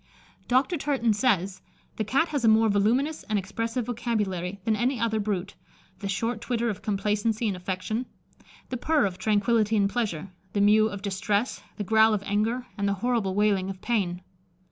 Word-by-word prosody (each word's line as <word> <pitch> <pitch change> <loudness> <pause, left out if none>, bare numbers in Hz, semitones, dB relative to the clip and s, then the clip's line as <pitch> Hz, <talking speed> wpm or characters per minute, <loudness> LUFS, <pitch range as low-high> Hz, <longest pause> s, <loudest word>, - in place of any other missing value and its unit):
Dr. 265 +8 +2
Turton 270 -6 +1
says, 200 -5 +1 0.4
"The 220 - 0
Cat 275 +10 +1
has 285 -5 -2
a - - +4
more 220 0 +5
voluminous 240 +10 +1
and 215 - -1
expressive 230 +5 -2
vocabulary 205 -6 -2
than 220 -1 +1
any 245 +3 0
other 220 -1 0
brute; 200 -2 -2 0.5
the 200 - -4
short 225 +3 -1
twitter 235 -1 0
of 205 - -8
complacency 210 +2 0
and 200 - -1
affection, 190 +6 -3 0.6
the 255 - -3
purr 310 +1 +2
of 185 -2 -3
tranquility 215 +2 +2
and 200 -1 +3
pleasure, 200 -6 -2 0.2
the 200 - +1
mew 215 +2 +5
of 200 -2 -7
distress, 205 +3 -1 0.2
the 210 - -2
growl 220 +1 +4
of 200 - -4
anger, 225 +5 0
and 200 - +1
the 200 - +2
horrible 225 -3 0
wailing 200 -2 +2
of 190 -1 -6
pain." 185 -6 -1
215 Hz, 175 wpm, -26 LUFS, 200-235 Hz, 0.6 s, more